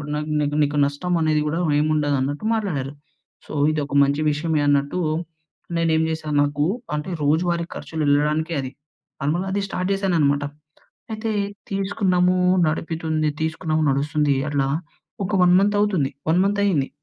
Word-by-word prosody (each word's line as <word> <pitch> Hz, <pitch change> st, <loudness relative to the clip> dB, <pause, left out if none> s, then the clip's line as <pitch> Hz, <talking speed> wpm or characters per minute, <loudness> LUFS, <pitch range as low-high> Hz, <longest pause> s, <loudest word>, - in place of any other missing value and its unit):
నాక్ 150 Hz, +1 st, -3 dB
నీకు, 145 Hz, 0 st, -1 dB
నీకు 145 Hz, 0 st, -1 dB
నష్టం 160 Hz, +6 st, -2 dB
అనేది 155 Hz, -1 st, +2 dB
గూడా 160 Hz, +3 st, -1 dB, 0.2 s
ఏమి 155 Hz, +1 st, +1 dB
ఉండదు 145 Hz, -2 st, +1 dB
అన్నట్టు 145 Hz, +9 st, -2 dB
మాట్లాడారు. 150 Hz, -11 st, -2 dB, 0.5 s
సో, -, -, -8 dB, 0.2 s
ఇది 155 Hz, -1 st, -1 dB
ఒక 140 Hz, -, -9 dB
మంచి 140 Hz, +2 st, +1 dB
విషయమే 155 Hz, 0 st, 0 dB
అన్నట్టు 145 Hz, +5 st, +1 dB, 0.8 s
నేను 165 Hz, -1 st, +1 dB
ఏం -, -, +2 dB
జేశాను, 155 Hz, -2 st, -2 dB
నాకు 145 Hz, 0 st, -1 dB, 0.3 s
అంటే 150 Hz, +4 st, -4 dB
రోజువారీ 170 Hz, +3 st, +1 dB
ఖర్చులు 160 Hz, -1 st, -4 dB
ఎళ్ళడానికే 150 Hz, +3 st, +1 dB
అది. 130 Hz, -, -6 dB, 0.5 s
నార్మల్‌గా 170 Hz, +7 st, -1 dB
అది 200 Hz, -, 0 dB
స్టార్ట్ 180 Hz, 0 st, -3 dB
చేశాననమాట. 160 Hz, -8 st, +1 dB, 0.7 s
అయితే 220 Hz, +1 st, -3 dB, 0.4 s
తీసుకున్నాము. 190 Hz, -2 st, +1 dB, 0.3 s
నడుపుతుంది. 160 Hz, 0 st, -1 dB
తీసుకున్నాము. 160 Hz, 0 st, -1 dB
నడుస్తుంది 145 Hz, +1 st, +1 dB, 0.2 s
అట్లా 140 Hz, -2 st, +1 dB, 0.6 s
ఒక 200 Hz, -, -4 dB
1 180 Hz, 0 st, +5 dB
మంతవుతుంది. 205 Hz, -8 st, +1 dB, 0.2 s
1 175 Hz, -, +3 dB
మంతయింది. 200 Hz, -8 st, +1 dB
155 Hz, 140 wpm, -22 LUFS, 145-180 Hz, 0.8 s, 1